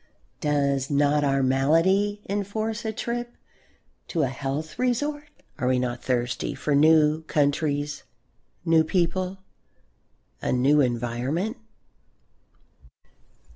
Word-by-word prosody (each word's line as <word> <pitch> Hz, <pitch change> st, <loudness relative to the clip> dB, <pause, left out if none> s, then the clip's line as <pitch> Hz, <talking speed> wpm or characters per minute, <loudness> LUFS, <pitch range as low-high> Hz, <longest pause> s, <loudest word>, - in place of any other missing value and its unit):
Does 140 Hz, -2 st, 0 dB
not 145 Hz, +1 st, +2 dB
our 135 Hz, -1 st, +2 dB
malady 165 Hz, +10 st, +2 dB
enforce 215 Hz, +3 st, -3 dB
a 220 Hz, -, 0 dB
trip 240 Hz, +2 st, -4 dB, 0.7 s
to 165 Hz, -4 st, 0 dB
a 135 Hz, -, +1 dB
health 140 Hz, +4 st, -4 dB
resort? 290 Hz, +4 st, -1 dB, 0.3 s
Are 125 Hz, -, 0 dB
we 130 Hz, 0 st, +3 dB
not 125 Hz, -1 st, -2 dB
thirsty 125 Hz, -1 st, -1 dB
for 150 Hz, -, -1 dB
new 155 Hz, +1 st, +5 dB
countries, 145 Hz, -1 st, 0 dB, 0.6 s
new 165 Hz, -1 st, +5 dB
people, 185 Hz, +3 st, -1 dB, 1.0 s
a -, -, -1 dB
new 140 Hz, +4 st, +4 dB
environment? 125 Hz, -, -1 dB
150 Hz, 100 wpm, -25 LUFS, 135-195 Hz, 1.0 s, new